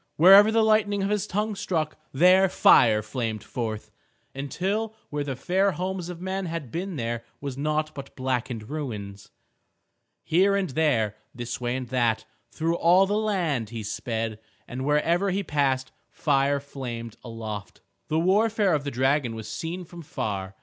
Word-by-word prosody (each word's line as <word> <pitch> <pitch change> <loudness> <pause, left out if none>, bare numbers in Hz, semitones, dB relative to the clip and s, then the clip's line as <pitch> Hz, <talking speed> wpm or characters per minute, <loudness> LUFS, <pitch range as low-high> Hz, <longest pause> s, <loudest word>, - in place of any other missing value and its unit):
Wherever 195 +6 +8
the 225 0 +3
lightning 210 -2 +2
of 200 - 0
his 210 -1 0
tongue 210 +3 -1
struck, 175 -6 -2 0.2
there 185 +6 +5
fire 110 -10 +5
flamed 110 -1 -3
forth, 110 -3 -5 0.4
until 195 +11 -2 0.2
where 145 -1 -1
the 135 -2 -4
fair 185 +8 +1
homes 185 0 -3
of 175 -2 -7
men 190 +1 -3
had 165 -7 -5
been 185 +2 -4
there 115 -3 -3 0.2
was 140 -2 -5
naught 155 +2 -1
but 135 -1 -9
blackened 125 -4 -2
ruins. 105 -9 -6 0.9
Here 195 +4 +3
and 195 -3 0
there, 120 -8 +1 0.2
this 120 0 -5
way 120 0 -1
and 130 -1 -4
that, 120 -4 +1 0.2
through 165 +6 -1
all 180 +3 +5
the 200 - -2
land 175 - 0
he 115 -1 -6
sped, 110 +1 -3 0.3
and 130 +2 -5
wherever 165 +6 +2
he 195 +2 -1
passed 135 -5 0 0.2
fire 140 -1 +1
flamed 120 -5 -7
aloft. 110 -4 -7 0.3
The 155 - 0
warfare 205 +3 +3
of 145 -2 0
the 140 - -2
dragon 130 -1 +1
was 110 -1 -7
seen 175 +2 -5
from 170 +1 -11
far. 95 - -4
145 Hz, 160 wpm, -26 LUFS, 120-185 Hz, 0.9 s, Wherever